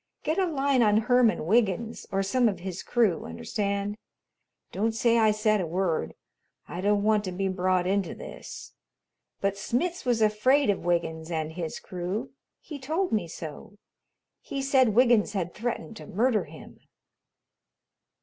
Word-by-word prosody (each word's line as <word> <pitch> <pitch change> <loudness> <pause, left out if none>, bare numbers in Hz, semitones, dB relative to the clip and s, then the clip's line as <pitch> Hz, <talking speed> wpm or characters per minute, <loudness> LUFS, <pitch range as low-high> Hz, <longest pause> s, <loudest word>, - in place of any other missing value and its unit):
"Get 315 +5 0
a 375 - +2
line 280 -4 +2
on 210 -2 +4
Herman 245 -6 +3
Wiggins 225 +3 +1
or 195 0 +1
some 240 +4 +2
of 195 - -5
his 185 0 -5
crew, 215 -9 +1
understand? 200 - -3 0.7
Don't 220 +3 0
say 230 +1 +3
I 220 -1 +5
said 215 -1 +2
a 175 - -2
word, 170 - -1 0.5
I 175 - -5
don't 205 +1 +2
want 215 -1 +3
to 185 - -3
be 190 +2 -1
brought 185 -1 +1
into 195 0 0
this, - - -9 0.7
but 200 0 0
Smitz 335 - -1
was 240 -3 +2
afraid 215 +4 +3
of 200 - -4
Wiggins 165 -2 -1
and 160 -2 -2
his 165 -1 -5
crew. 190 +8 -4 0.3
He 300 -3 -8
told 320 +8 -1
me 210 -6 0
so. 165 +6 -9 0.7
He 275 - -5
said 260 -5 +3
Wiggins 240 -4 +4
had 175 -4 -2
threatened 230 -8 -4
to 155 - -10
murder 225 +2 +1
him." - - -13
210 Hz, 155 wpm, -27 LUFS, 185-240 Hz, 0.7 s, I